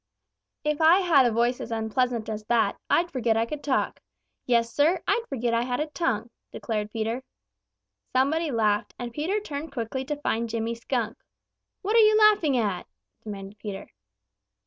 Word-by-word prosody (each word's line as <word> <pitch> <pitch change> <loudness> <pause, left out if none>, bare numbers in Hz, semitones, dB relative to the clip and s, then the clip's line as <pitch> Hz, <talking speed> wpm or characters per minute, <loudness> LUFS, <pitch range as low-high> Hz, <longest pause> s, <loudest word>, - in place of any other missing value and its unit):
"If 300 +1 0
I 335 +5 +6
had 300 -8 +5
a - - +1
voice 240 +2 +1
as - - -6
unpleasant 230 +1 -1
as 215 -1 -4
that, 220 -3 +2
I'd 345 +1 +2
forget 235 -4 +1
I 225 - +2
could 295 +5 -6
talk. 275 -3 0 0.5
Yes, 235 -1 +2
Sir, 315 +6 +3
I'd 470 - +1
forget 240 -3 -1
I 230 - +2
had 245 0 -2
a 300 - +1
tongue," 255 -8 -2 0.2
declared 210 -2 -3
Peter. 225 +3 -3 0.9
Somebody 300 +5 +2
laughed, 215 -3 0
and 240 -1 -6
Peter 345 - -1
turned 315 -6 -6
quickly 250 +2 -3
to 295 +2 -2
find 235 -5 -1
Jimmy 230 +1 -2
Skunk. 230 -1 -3 0.6
"What 420 +4 0
are - - +7
you 430 -1 +6
laughing 415 -11 +5
at?" 205 -6 -1 0.4
demanded 200 -1 -8
Peter. 200 -2 -7
245 Hz, 170 wpm, -26 LUFS, 225-300 Hz, 0.9 s, are